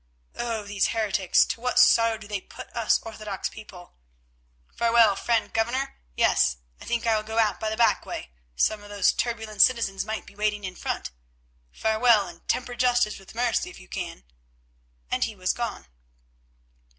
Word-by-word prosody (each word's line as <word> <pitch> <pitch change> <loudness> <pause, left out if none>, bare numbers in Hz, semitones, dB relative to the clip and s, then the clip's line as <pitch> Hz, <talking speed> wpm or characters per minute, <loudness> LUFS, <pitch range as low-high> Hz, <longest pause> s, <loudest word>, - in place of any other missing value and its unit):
Oh! 230 -3 -3
these 200 -1 0
heretics, 205 -4 +2
to 230 - -5
what 250 0 -1
sorrow 230 -2 +5
do 215 - -12
they 205 -2 -3
put - - -12
us 230 -2 +2
orthodox 215 -3 -5
people! 185 -5 -12 0.8
Farewell, 230 -3 +4
friend 230 +2 0
Governor; 245 +5 -1 0.2
yes, 65 - +3 0.2
I - - -10
think 235 -1 -1
I 225 -1 +3
will 215 - 0
go 220 +1 -6
out 215 -3 +2
by 220 - -1
the 220 - -3
back 235 -1 +3
way, - - -7 0.2
some 215 - +1
of 205 - -13
those 205 -2 +2
turbulent 220 -3 -2
citizens 225 -6 +3
might 220 +1 -4
be - - -15
waiting 210 0 -1
in 185 -1 -5
front. - - -4 0.6
Farewell, 220 - +3
and 170 -1 -13
temper 245 -1 -1
justice 245 -4 +2
with 195 +3 -15
mercy 240 -1 0
if - - -12
you - - -15
can," 60 - -6 0.9
and - - +1
he 220 - -7
was 185 -1 0
gone. 235 - -4
220 Hz, 175 wpm, -26 LUFS, 205-235 Hz, 0.9 s, sorrow